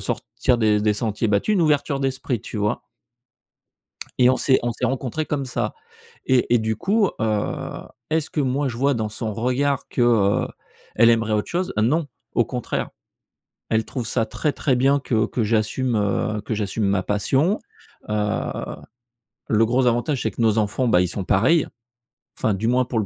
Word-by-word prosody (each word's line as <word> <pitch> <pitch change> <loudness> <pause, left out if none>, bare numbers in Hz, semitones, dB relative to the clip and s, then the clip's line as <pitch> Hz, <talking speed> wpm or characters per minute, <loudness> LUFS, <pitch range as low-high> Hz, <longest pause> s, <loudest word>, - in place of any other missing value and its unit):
sortir 125 -2 -1
des 105 -2 +3
des 105 0 +2
sentiers 110 +1 -1
battus, 100 - +2
une 195 - +2
ouverture 145 -2 +1
d'esprit, 130 -3 -2
tu 115 - -8
vois. 105 +3 -1 1.3
Et 125 0 +6
on 130 - +2
s'est 130 - +3
on 120 -1 -1
s'est - - -4
rencontrés 135 +4 -2
comme 145 -2 -2
ça, 125 - -3 0.5
et 125 -2 +2
et - - +6
du 110 -1 -1
coup, 200 - +2
heu, 110 -2 -1 0.4
est-ce 160 -1 0
que 150 - 0
moi 135 +2 0
je 120 - -4
vois 140 +3 +2
dans 110 -2 -2
son 110 0 -4
regard 130 +5 0
que, 125 - -1
heu, 110 -4 +3 0.5
elle 115 +1 +6
aimerait 115 -1 +1
autre 105 -1 -1
chose? 180 +2 -2
Non, 145 +9 +2 0.3
au - - +3
contraire - - -3 0.8
elle 110 0 +2
trouve 125 -5 -4
ça 115 -1 0
très, 150 +5 -1
très 130 -4 0
bien 135 +2 +3
que 115 -4 +1
que 120 - -2
j'assume, 115 +3 0
heu, 105 +1 0
que 110 - -3
j'assume 105 +1 -2
ma 100 -1 +1
passion, 130 - +1 0.5
heu, 105 - -1 1.3
le 110 0 +3
gros 125 +2 +2
avantage, 120 +3 +1
c'est 110 - 0
que 115 - -8
nos 110 -1 +3
enfants, 115 +4 0
bah 90 - +4
ils 90 - 0
sont 95 +2 -4
pareils 125 - +3 0.7
enfin 110 - +1
du 110 +4 -2
moins 125 +1 +3
pour 120 -1 -3
le 105 - -1
120 Hz, 185 wpm, -22 LUFS, 110-135 Hz, 1.3 s, Et